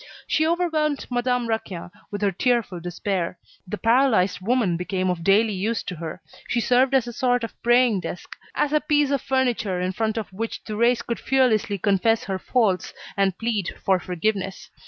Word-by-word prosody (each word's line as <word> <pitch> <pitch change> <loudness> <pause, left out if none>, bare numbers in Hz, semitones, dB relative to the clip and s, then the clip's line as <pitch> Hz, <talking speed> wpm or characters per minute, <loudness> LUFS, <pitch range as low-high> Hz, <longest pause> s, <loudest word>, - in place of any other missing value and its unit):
She 315 0 +1
overwhelmed 320 -4 0
Madame 245 0 +1
Raquin 200 -6 -4 0.2
with 205 0 -4
her 200 - +3
tearful 230 -2 0
despair. 175 +1 -3 0.3
The 210 +3 -4
paralysed 225 -6 +3
woman 220 -4 +1
became 185 +1 -1
of 170 -2 -4
daily 210 +4 +4
use 210 +4 -1
to 180 - -5
her. 165 0 -6 0.3
She 240 - 0
served 255 +3 +3
as 260 -3 +3
a 240 - -6
sort 245 -1 +1
of 230 - -4
praying 240 -3 +4
desk, 180 - -7 0.2
as 295 - +1
a 305 - +3
piece 295 -2 +2
of 280 -3 +1
furniture 240 -8 0
in 180 +1 -1
front 220 +3 -1
of 215 -3 -4
which 225 +4 -4
Thérèse 235 +3 +1
could 235 - -3
fearlessly 235 -5 +2
confess 205 +3 +2
her 190 -1 -3
faults 205 -4 0 0.2
and 195 -2 +1
plead 225 -5 -2
for 190 -1 +3
forgiveness. 190 +2 -3
220 Hz, 180 wpm, -24 LUFS, 190-250 Hz, 0.3 s, daily